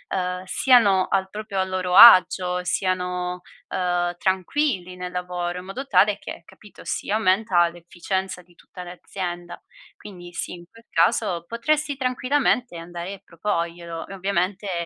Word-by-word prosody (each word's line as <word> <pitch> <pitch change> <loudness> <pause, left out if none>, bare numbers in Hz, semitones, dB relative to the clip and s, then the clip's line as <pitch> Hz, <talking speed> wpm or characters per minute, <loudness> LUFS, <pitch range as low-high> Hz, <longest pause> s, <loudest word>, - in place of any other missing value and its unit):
uhm, 180 -1 -2
siano 200 -4 +4
al 190 -1 0
proprio 210 -1 -5
a - - +3
loro 185 -1 -2
agio, 180 -3 +7
siano, 180 0 -2 0.3
uhm, 175 -1 -1
tranquilli 190 - -1
nel 180 0 -6
lavoro, 180 0 -4
in 180 - -11
modo 225 +9 -6
tale 200 -3 +3
che, - - -9
capito, 210 - -16
si - - -4
aumenta 190 -4 +3
l'efficienza 180 +2 -5
di 175 0 -25
tutta 180 - -12
l'azienda. 175 -1 -7 0.4
Quindi 175 -4 -11
sì, - - -5
in 175 -1 -10
quel 230 0 -19
caso 175 0 +1
potresti 285 - -1
tranquillamente 255 -4 0
andare 175 +3 -7
a - - -19
proporglielo 170 -1 -4
e - - -9
ovviamente 190 -1 -2
185 Hz, 140 wpm, -23 LUFS, 175-200 Hz, 0.4 s, agio